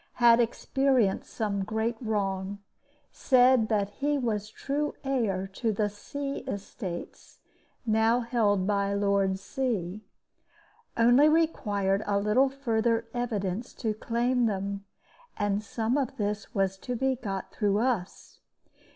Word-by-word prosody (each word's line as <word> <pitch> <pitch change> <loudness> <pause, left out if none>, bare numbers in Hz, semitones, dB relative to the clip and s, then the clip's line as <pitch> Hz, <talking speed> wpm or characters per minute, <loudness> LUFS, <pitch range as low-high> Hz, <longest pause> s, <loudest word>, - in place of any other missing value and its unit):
Had 235 -1 +5
experienced 245 -2 +1
some 200 -3 -1
great 220 +3 -1
wrong. 200 -3 -2 0.5
Said 250 -3 +4
that 205 -2 +1
he 290 +5 0
was 215 -5 -2
true 290 +6 -2
heir 225 -9 0
to 225 +2 0
the 210 0 0
C. 275 +7 -5
estates 195 -3 -7 0.5
now 225 +2 +3
held 215 -5 +1
by 200 0 +1
Lord 200 -1 +1
C. 200 -3 -3 1.0
Only 245 +6 +6
required 205 -12 +1
a 200 -1 +2
little 210 +7 +3
further 230 -4 0
evidence 225 -3 -3
to 220 -3 -1
claim 240 +2 +1
them; 200 -1 -3 0.5
and 205 0 0
some 225 +5 -1
of 270 0 -3
this 210 -1 -3
was 195 -1 0
to 250 +3 -4
be 265 +2 +1
got 195 -6 -5
through 205 -2 +1
us. 225 -6 -2
220 Hz, 125 wpm, -28 LUFS, 200-245 Hz, 1.0 s, Only